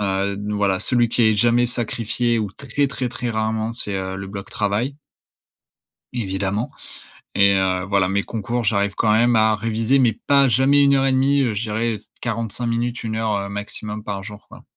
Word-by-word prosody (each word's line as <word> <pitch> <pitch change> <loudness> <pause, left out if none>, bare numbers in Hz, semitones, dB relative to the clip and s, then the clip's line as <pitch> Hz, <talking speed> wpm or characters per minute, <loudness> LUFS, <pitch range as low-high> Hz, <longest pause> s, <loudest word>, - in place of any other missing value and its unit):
heu, 100 0 -1
voilà, 100 -3 0
celui 120 -2 +4
qui 120 - +1
est 110 -1 +4
jamais 120 +2 +3
sacrifié 120 0 -1
ou 105 -3 -2
très, 140 +6 -2
très, 130 -2 -3
très 120 0 -4
rarement 110 0 -1
c'est, 105 -4 -1
heu, 95 0 -3
le 95 0 -6
bloc 100 0 -8
travail 105 +7 -1 1.2
évidemment 100 -1 -2 0.7
et 100 0 +5
heu, 95 -1 0
voilà, 95 -1 +2
mes 100 +1 0
concours 120 +2 -3
j'arrive 100 -2 +1
quand 105 - +2
même 120 +2 +4
à 110 0 +4
réviser 115 +4 +1
mais 120 -4 +3
pas 140 +5 +3
jamais 135 +4 +4
1 140 0 +4
heure 135 0 +2
et 135 - +2
1/2, 135 +2 +3
heu, 120 -5 +1
je 105 - -3
dirais 110 0 -2 0.2
45 115 0 -3
minutes, 120 +1 -2
1 110 -1 -3
heure, 110 -2 0
heu, 100 0 -4
maximum 105 +1 -6
par 100 -2 -5
jour, 105 0 -11
quoi. - - -14
110 Hz, 190 wpm, -21 LUFS, 100-120 Hz, 1.2 s, et